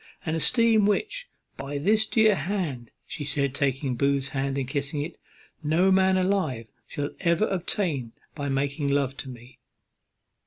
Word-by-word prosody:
An 160 - -1
esteem 220 +5 +4
which, - - -1 0.3
by 140 +1 -4
this 215 +8 +2
dear 220 -2 +4
hand," 175 - -3 0.2
said 145 -3 -4
she, 140 0 +1
taking 135 0 -1
Booth's 140 +2 +1
hand 135 0 -2
and 135 -2 -2
kissing 145 +1 -2
it, 170 - -7 0.5
"no 165 +5 +3
man 190 0 +4
alive 185 - 0 0.2
shall 145 0 -3
ever 170 +4 +2
obtain 170 - -1 0.2
by 145 -2 -4
making 140 +2 -1
love 140 -1 +1
to 130 - -6
me." 125 +1 -12
145 Hz, 150 wpm, -26 LUFS, 135-190 Hz, 0.5 s, esteem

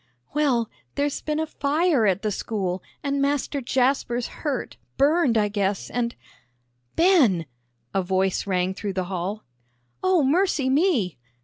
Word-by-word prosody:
"Well, 265 -6 +2 0.3
there's 285 0 -1
been 305 0 -2
a 320 - 0
fire 300 -4 +1
at 195 +1 +1
the 215 - 0
school, 190 -3 -2 0.2
and 280 -1 0
Master 280 0 0
Jasper's 250 -1 +1 0.2
hurt, 275 - -2 0.2
burned, 285 -4 +3
I 210 -1 +3
guess, 200 -1 -1
and 240 -1 -1 0.4
" 120 0 -45
"Ben!" 280 - +4 0.5
a 195 - +2
voice 190 +1 0
rang 185 -1 +1
through 200 0 -4
the 185 0 -1
hall. 190 +4 -3 0.6
"O 370 -4 +3
mercy 290 -2 +2
me!" 270 - +2
240 Hz, 140 wpm, -24 LUFS, 190-290 Hz, 0.6 s, Ben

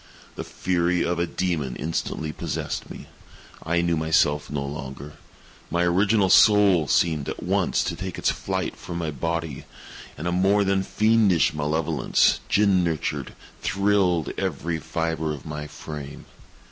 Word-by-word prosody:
The - - -6
fury 90 -1 0
of 85 0 -1
a 85 - 0
demon 80 -10 -2
instantly 80 -1 -3
possessed - - -4
me. - - -9 0.6
I 85 +1 +1
knew 85 -1 +1
myself 75 -2 +1
no 70 -2 -3
longer. 70 0 -7 0.6
My 85 0 +1
original 100 +4 +3
soul 100 -7 +6
seemed, 75 0 +1
at - - -6
once, - - +1
to - - -3
take 95 -1 -6
its - - +1
flight - - -3
from 85 - -7
my 80 -2 -2
body 80 0 -3 0.5
and 80 +4 -4
a - - 0
more 95 +3 +3
than 95 0 +1
fiendish 105 - +3
malevolence, 75 +1 +1
gin 100 -3 +3
nurtured, 80 -4 -2 0.3
thrilled 100 -5 +1
every 85 -3 -2
fibre 80 0 -2
of 65 - -13
my 75 -1 -5
frame. 75 -2 -8
85 Hz, 145 wpm, -24 LUFS, 75-95 Hz, 0.6 s, soul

